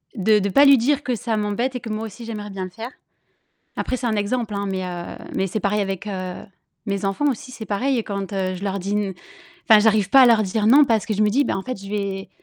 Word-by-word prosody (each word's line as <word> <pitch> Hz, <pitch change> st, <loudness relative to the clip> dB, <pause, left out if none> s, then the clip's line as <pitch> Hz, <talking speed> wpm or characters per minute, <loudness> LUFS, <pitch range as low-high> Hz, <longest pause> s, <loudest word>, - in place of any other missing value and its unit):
de 210 Hz, +1 st, +3 dB
de 200 Hz, 0 st, -1 dB
pas 280 Hz, +8 st, +5 dB
lui 275 Hz, -1 st, +8 dB
dire 285 Hz, +4 st, +1 dB
que 250 Hz, -2 st, -1 dB
ça 225 Hz, 0 st, -2 dB
m'embête 210 Hz, +5 st, -1 dB
et -, -, -2 dB
que 225 Hz, -, -8 dB
moi 215 Hz, +1 st, -3 dB
aussi 225 Hz, +2 st, -9 dB
j'aimerais 210 Hz, -2 st, -6 dB
bien 195 Hz, -1 st, -5 dB
le -, -, -8 dB
faire. 230 Hz, +5 st, -7 dB, 0.9 s
Après, 255 Hz, -, -1 dB
c'est 245 Hz, -, -5 dB
un 215 Hz, -2 st, 0 dB
exemple, 215 Hz, +1 st, -1 dB
hein, 200 Hz, 0 st, -2 dB
mais 190 Hz, -1 st, -2 dB
heu, 175 Hz, -1 st, -6 dB, 0.2 s
mais 190 Hz, -, 0 dB
c'est 205 Hz, +2 st, -3 dB
pareil 210 Hz, +1 st, +1 dB
avec, 195 Hz, 0 st, -3 dB
heu, 185 Hz, -3 st, -4 dB, 0.5 s
mes 200 Hz, 0 st, -2 dB
enfants 240 Hz, +10 st, +1 dB
aussi. 255 Hz, +2 st, -8 dB
C'est 220 Hz, -3 st, -8 dB
pareil 245 Hz, +7 st, 0 dB
et 225 Hz, -, -1 dB
quand, 200 Hz, -1 st, -5 dB
heu, 185 Hz, -1 st, -1 dB
je 190 Hz, -, -8 dB
leur 195 Hz, 0 st, -2 dB
dis 195 Hz, +3 st, -4 dB
n 205 Hz, -2 st, -1 dB, 0.5 s
enfin, 220 Hz, -3 st, +7 dB
j'arrive 210 Hz, -3 st, +3 dB
pas 270 Hz, -, +7 dB
à -, -, +8 dB
leur 225 Hz, -3 st, +5 dB
dire 210 Hz, +2 st, 0 dB
«non», 285 Hz, +5 st, +7 dB
parce 225 Hz, -2 st, +1 dB
que 220 Hz, -, -2 dB
je 210 Hz, -, -1 dB
me 210 Hz, -, +4 dB
dis 275 Hz, +6 st, +2 dB
bah, -, -, -1 dB
en -, -, -3 dB
fait 255 Hz, -6 st, -6 dB
je 195 Hz, -, -9 dB
vais 200 Hz, -2 st, -3 dB
210 Hz, 275 wpm, -22 LUFS, 195-235 Hz, 0.9 s, lui